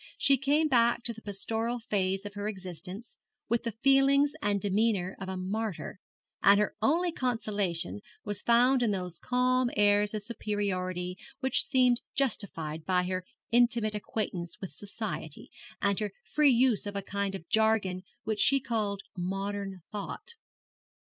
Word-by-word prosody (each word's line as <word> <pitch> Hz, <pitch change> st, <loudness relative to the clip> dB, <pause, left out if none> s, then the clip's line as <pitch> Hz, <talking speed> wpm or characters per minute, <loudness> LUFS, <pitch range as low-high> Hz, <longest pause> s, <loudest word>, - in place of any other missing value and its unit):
She 275 Hz, -, +5 dB
came 290 Hz, +4 st, +3 dB
back 235 Hz, -3 st, +3 dB
to 235 Hz, -, -1 dB
the 225 Hz, -, -13 dB
pastoral 225 Hz, +4 st, -2 dB
phase 195 Hz, -3 st, -1 dB
of 205 Hz, -, -6 dB
her 205 Hz, 0 st, -4 dB
existence 190 Hz, +2 st, -7 dB, 0.3 s
with 235 Hz, 0 st, +2 dB
the 230 Hz, -, -3 dB
feelings 275 Hz, +1 st, +5 dB
and 205 Hz, -5 st, +1 dB
demeanour 200 Hz, -2 st, +1 dB
of 190 Hz, -1 st, -5 dB
a 190 Hz, -, -3 dB
martyr; 195 Hz, 0 st, -3 dB, 0.4 s
and 200 Hz, +1 st, +6 dB
her 210 Hz, -, 0 dB
only 335 Hz, +9 st, +2 dB
consolation 205 Hz, -, -1 dB, 0.2 s
was 205 Hz, 0 st, 0 dB
found 245 Hz, +2 st, +4 dB
in 235 Hz, -, +2 dB
those 180 Hz, -4 st, -3 dB
calm 250 Hz, 0 st, +2 dB
airs 205 Hz, +1 st, +3 dB
of 210 Hz, -, -3 dB
superiority 185 Hz, -5 st, -2 dB, 0.2 s
which 265 Hz, -1 st, +3 dB
seemed 250 Hz, -3 st, +3 dB
justified 165 Hz, -, -1 dB
by 180 Hz, 0 st, +2 dB
her 185 Hz, 0 st, -3 dB, 0.3 s
intimate 235 Hz, -2 st, +3 dB
acquaintance 200 Hz, -4 st, -4 dB
with 190 Hz, -, -6 dB
society, 200 Hz, -7 st, -5 dB, 0.3 s
and 200 Hz, 0 st, +2 dB
her 210 Hz, -2 st, -3 dB
free 300 Hz, -1 st, +3 dB
use 245 Hz, -4 st, +3 dB
of 205 Hz, -, -5 dB
a 200 Hz, -, -2 dB
kind 200 Hz, 0 st, -2 dB
of 170 Hz, -3 st, -9 dB
jargon 220 Hz, -4 st, +2 dB, 0.2 s
which 220 Hz, -1 st, -2 dB
she 275 Hz, 0 st, +4 dB
called 215 Hz, -6 st, -2 dB
modern 195 Hz, 0 st, -3 dB
thought. 210 Hz, -, -6 dB
210 Hz, 150 wpm, -30 LUFS, 190-240 Hz, 0.4 s, and